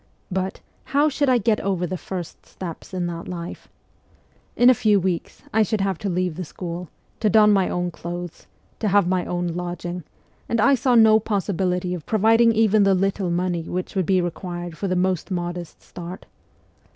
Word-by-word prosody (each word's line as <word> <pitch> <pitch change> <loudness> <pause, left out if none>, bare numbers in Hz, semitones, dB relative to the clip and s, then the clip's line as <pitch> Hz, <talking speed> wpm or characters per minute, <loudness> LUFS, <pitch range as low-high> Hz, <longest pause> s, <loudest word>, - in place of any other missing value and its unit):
But 190 +1 -2 0.2
how 290 +2 +3
should 285 -1 +1
I 255 - +5
get 220 -1 +1
over 190 -3 -1
the 185 - -3
first 180 -1 -7
steps 170 -4 -8
in 180 -2 -2
that 170 -1 -5
life? 175 -1 -7 0.9
In 245 - +5
a 255 - +9
few 210 -3 +3
weeks 180 -2 -3
I 220 - +4
should 215 0 +1
have 195 -3 -1
to 200 - -2
leave 180 -2 -1
the 185 - -3
school, 175 +1 -6 0.3
to 215 - +2
don 210 0 +6
my 195 -2 +2
own 175 0 -1
clothes, 175 +1 -7 0.3
to 215 - 0
have 200 -1 +4
my 185 -1 +1
own 175 0 -2
lodging, 175 0 -4 0.5
and 230 - +1
I 275 +6 +5
saw 255 -1 +2
no 220 -1 +7
possibility 185 -4 -1
of 170 -4 -7
providing 225 +2 +4
even 220 -1 +3
the 195 -1 +4
little 195 0 0
money 175 0 0
which 180 +3 -4
would 185 -3 0
be 185 -2 +3
required 175 -1 -5
for 195 - -3
the 185 - 0
most 185 0 0
modest 175 -2 -4
start. 175 +1 -9
185 Hz, 190 wpm, -23 LUFS, 175-210 Hz, 0.9 s, a